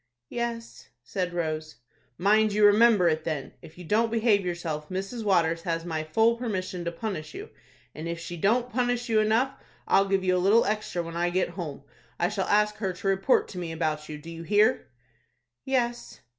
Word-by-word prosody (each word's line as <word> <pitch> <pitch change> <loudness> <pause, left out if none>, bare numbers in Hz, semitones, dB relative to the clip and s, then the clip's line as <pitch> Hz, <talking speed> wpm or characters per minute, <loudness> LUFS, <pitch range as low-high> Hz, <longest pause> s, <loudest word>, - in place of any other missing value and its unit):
"Yes," 235 -1 -5 0.2
said 180 -3 -3
Rose. 155 -2 -3 0.4
"Mind 210 +3 +3
you 210 0 +4
remember 205 -2 +6
it, 155 -1 +1
then. 150 -5 -4
If 155 - -14
you 180 - -9
don't 220 +6 +2
behave 220 -3 +2
yourself, 165 -4 -4
Mrs. 195 +5 -4
Waters 170 -5 +2
has 165 0 -2
my 160 -2 -2
full 225 +9 +2
permission 185 -7 -3
to 170 - -1
punish 165 -4 -5
you, - - -8 0.4
and 155 +3 -6
if 170 0 -4
she 175 +1 -6
don't 235 +8 +1
punish 245 0 -1
you 220 -1 +3
enough, 225 +5 +2 0.4
I'll 195 0 +4
give 195 -1 +1
you 185 0 +2
a 180 - +1
little 210 +5 +4
extra 210 -4 -2
when 165 0 -8
I 175 +1 +1
get 185 +1 0
home. 170 -6 -7 0.4
I 175 - +2
shall 200 -2 -2
ask 210 0 +2
her 195 -4 -2
to 185 - -6
report 195 +6 +2
to 185 - -7
me 170 -2 -4
about 155 -2 -2
you. 150 - -5
Do 160 +3 -10
you 165 0 -8
hear?" 210 - +2 0.8
"Yes." 240 -3 -2
190 Hz, 195 wpm, -27 LUFS, 165-220 Hz, 0.8 s, remember